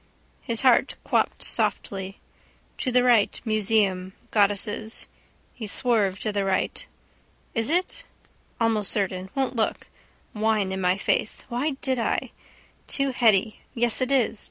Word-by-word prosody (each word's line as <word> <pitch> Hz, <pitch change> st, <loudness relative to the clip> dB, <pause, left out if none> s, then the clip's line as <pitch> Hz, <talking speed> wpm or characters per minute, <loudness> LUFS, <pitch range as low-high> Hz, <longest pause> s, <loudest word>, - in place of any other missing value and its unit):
His 230 Hz, 0 st, -3 dB
heart 255 Hz, -3 st, +4 dB
quopped -, -, 0 dB
softly. 195 Hz, 0 st, -1 dB, 0.6 s
To 255 Hz, -, -1 dB
the 250 Hz, 0 st, +4 dB
right. 235 Hz, -5 st, +3 dB
Museum. 205 Hz, -4 st, +1 dB, 0.2 s
Goddesses. 210 Hz, +1 st, +1 dB, 0.5 s
He 220 Hz, -3 st, -7 dB
swerved 205 Hz, -4 st, +1 dB
to 215 Hz, -, -1 dB
the 200 Hz, -1 st, -1 dB
right. 190 Hz, -1 st, -1 dB, 0.7 s
Is 225 Hz, +1 st, +1 dB
it? 360 Hz, +9 st, 0 dB, 0.6 s
Almost 225 Hz, -4 st, +1 dB
certain. 190 Hz, -2 st, -2 dB
Won't 265 Hz, -1 st, -1 dB
look. 220 Hz, -2 st, -1 dB, 0.5 s
Wine 215 Hz, -2 st, 0 dB
in 190 Hz, 0 st, -3 dB
my 180 Hz, +1 st, +2 dB
face. 205 Hz, -, -1 dB
Why 265 Hz, +4 st, -2 dB
did 260 Hz, -2 st, 0 dB
I? 230 Hz, -, -1 dB, 0.6 s
Too 275 Hz, -1 st, +1 dB
heady. 220 Hz, -4 st, +2 dB, 0.2 s
Yes, 240 Hz, +1 st, +2 dB
it 255 Hz, +1 st, 0 dB
is. 240 Hz, -5 st, +2 dB
220 Hz, 130 wpm, -25 LUFS, 200-245 Hz, 0.7 s, heart